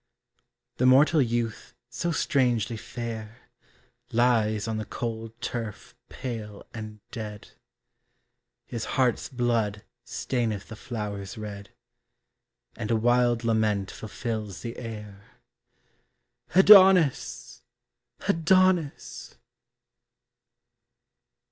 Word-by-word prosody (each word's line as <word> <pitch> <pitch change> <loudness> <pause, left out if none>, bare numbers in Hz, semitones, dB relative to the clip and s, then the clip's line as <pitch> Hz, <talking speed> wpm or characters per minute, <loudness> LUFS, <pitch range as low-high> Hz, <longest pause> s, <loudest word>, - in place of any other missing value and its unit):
The 125 - +3
mortal 145 +4 +6
youth 120 0 -2 0.2
so 135 +8 -2
strangely 120 -8 +1
fair, 115 -1 -6 0.7
Lies 115 -3 +2
on 110 -1 -2
the 110 - -4
cold 115 -1 -5
turf 115 -4 -5 0.2
pale 110 -5 -6
and 110 -2 -8
dead; 105 -3 -7 1.2
His 115 -2 -5
heart's 130 -3 +1
blood 115 -5 0 0.2
staineth 120 -4 -2
the 115 - -7
flowers 105 -4 -6
red, 100 -2 -7 1.1
And 110 -2 -5
a 115 - +3
wild 120 +1 +2
lament 110 -3 +1
fulfills 110 -2 -5
the 115 0 -6
air, 105 -4 -8 1.3
Adonis! 180 - +6 0.7
Adonis! 185 -3 +1
115 Hz, 85 wpm, -27 LUFS, 110-125 Hz, 1.3 s, mortal